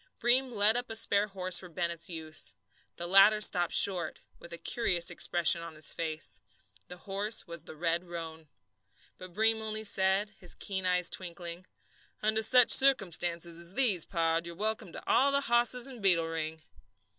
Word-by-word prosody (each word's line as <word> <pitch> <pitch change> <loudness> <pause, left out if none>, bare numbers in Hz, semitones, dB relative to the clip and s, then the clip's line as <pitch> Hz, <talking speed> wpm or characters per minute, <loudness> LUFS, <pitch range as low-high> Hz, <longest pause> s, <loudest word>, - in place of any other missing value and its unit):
Breem 250 +2 +1
led 215 0 +3
up 245 0 -3
a 225 - -4
spare 205 -1 +2
horse 185 -3 +1
for 180 - -12
Bennett's 170 0 -4
use. 160 -2 -6 0.4
The 175 - -6
latter 195 +4 +5
stopped 175 -4 +2
short, 185 -3 +2 0.2
with 170 - -13
a 170 - -6
curious 180 -4 -1
expression 170 -1 +3
on 165 -1 -9
his 155 - -2
face. 155 -8 -6 0.5
The 180 - -10
horse 205 +3 0
was 170 -1 -10
the - - -10
red 170 +2 -1
roan. 165 -2 -8 0.7
But 185 -1 -11
Breem 220 +2 +1
only 215 0 -5
said, 195 0 +1
his 180 - -5
keen 190 -2 -4
eyes 180 -1 +1
twinkling: 175 0 -8 0.6
"Under 220 +1 +1
such 250 +2 +5
circumstances 175 -9 +2
as 170 +2 -4
these, 225 -11 +3
pard, 165 -1 -1
you're 170 - -8
welcome 210 -1 -4
to - - -10
all 280 +1 +3
the 280 0 +1
hosses 240 -1 +1
in 255 -4 -8
Beetle 175 -4 +3
Ring." 160 -1 -5
185 Hz, 170 wpm, -30 LUFS, 170-215 Hz, 0.7 s, latter